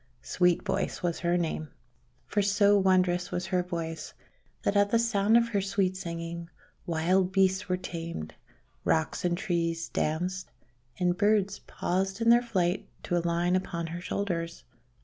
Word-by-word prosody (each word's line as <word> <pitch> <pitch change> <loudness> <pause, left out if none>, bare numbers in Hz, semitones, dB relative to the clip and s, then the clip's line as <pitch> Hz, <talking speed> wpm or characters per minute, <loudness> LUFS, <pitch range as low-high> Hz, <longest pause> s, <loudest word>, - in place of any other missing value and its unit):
Sweet 180 -1 +2
Voice - - -2
was 170 -2 0
her 175 0 +1
name, 160 -2 -2 0.6
for 205 - 0
so 205 0 +4
wondrous 185 -2 +2
was 180 - -2
her 180 -1 +1
voice 165 -2 -5 0.5
that 200 - +1
at 200 0 +4
the 230 - +3
sound 225 -1 +3
of 235 0 +2
her 205 -3 +1
sweet 190 -1 0
singing, 170 -2 -5 0.4
wild 180 +3 +2
beasts 190 0 +2
were 180 - +1
tamed, 165 - -6 0.5
rocks 160 -1 0
and 175 -1 +1
trees 165 -3 -1
danced, 180 +4 -2 0.5
and 180 -1 +1
birds 205 -1 +2
paused 190 +3 -2
in 230 0 +3
their 240 +1 +6
flight 190 -6 -1
to 175 - -1
alight 170 +1 +1
upon 170 -2 -2
her 170 +2 -5
shoulders. 175 -4 -3
180 Hz, 150 wpm, -29 LUFS, 170-195 Hz, 0.6 s, their